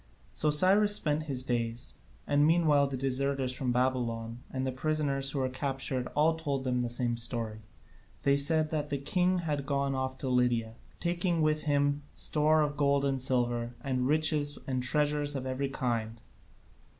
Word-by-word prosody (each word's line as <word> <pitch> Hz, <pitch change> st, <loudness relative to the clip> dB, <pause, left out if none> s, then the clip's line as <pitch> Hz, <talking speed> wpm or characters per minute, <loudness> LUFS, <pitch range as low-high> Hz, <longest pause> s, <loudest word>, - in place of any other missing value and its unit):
So 155 Hz, -, +1 dB
Cyrus 195 Hz, +7 st, +7 dB
spent 155 Hz, -4 st, 0 dB
his 130 Hz, -2 st, 0 dB
days, 120 Hz, 0 st, -3 dB, 0.3 s
and 145 Hz, 0 st, +2 dB
meanwhile 155 Hz, -4 st, +3 dB
the 135 Hz, -1 st, -4 dB
deserters 135 Hz, 0 st, -1 dB
from 130 Hz, -1 st, -2 dB
Babylon 120 Hz, -2 st, -1 dB
and 130 Hz, 0 st, -3 dB
the 130 Hz, -, -1 dB
prisoners 140 Hz, 0 st, -1 dB
who 140 Hz, -, -5 dB
were 130 Hz, -1 st, 0 dB
captured 130 Hz, -1 st, -3 dB
all 155 Hz, +2 st, +3 dB
told 145 Hz, -4 st, -3 dB
the 125 Hz, -2 st, -1 dB
same 120 Hz, -1 st, -1 dB
story: 115 Hz, -2 st, -1 dB, 0.6 s
they 140 Hz, 0 st, +3 dB
said 155 Hz, +2 st, +2 dB
that 150 Hz, -2 st, -2 dB
the 140 Hz, -, -1 dB
king 180 Hz, +6 st, +1 dB
had 145 Hz, -3 st, -2 dB
gone 140 Hz, -1 st, 0 dB
off 130 Hz, 0 st, -3 dB
to 135 Hz, -, -5 dB
Lydia, 120 Hz, -3 st, +1 dB, 0.3 s
taking 175 Hz, -1 st, 0 dB
with 155 Hz, 0 st, 0 dB
him 145 Hz, 0 st, +1 dB
store 155 Hz, 0 st, +2 dB
of 145 Hz, -1 st, -3 dB
gold 140 Hz, -1 st, +2 dB
and 135 Hz, -1 st, -1 dB
silver, 120 Hz, -2 st, -1 dB
and 130 Hz, -2 st, -1 dB
riches 150 Hz, -1 st, 0 dB
and 130 Hz, -3 st, -2 dB
treasures 145 Hz, +2 st, +1 dB
of 130 Hz, -1 st, -4 dB
every 130 Hz, +1 st, -2 dB
kind. 115 Hz, -4 st, -3 dB
140 Hz, 165 wpm, -30 LUFS, 125-150 Hz, 0.6 s, Cyrus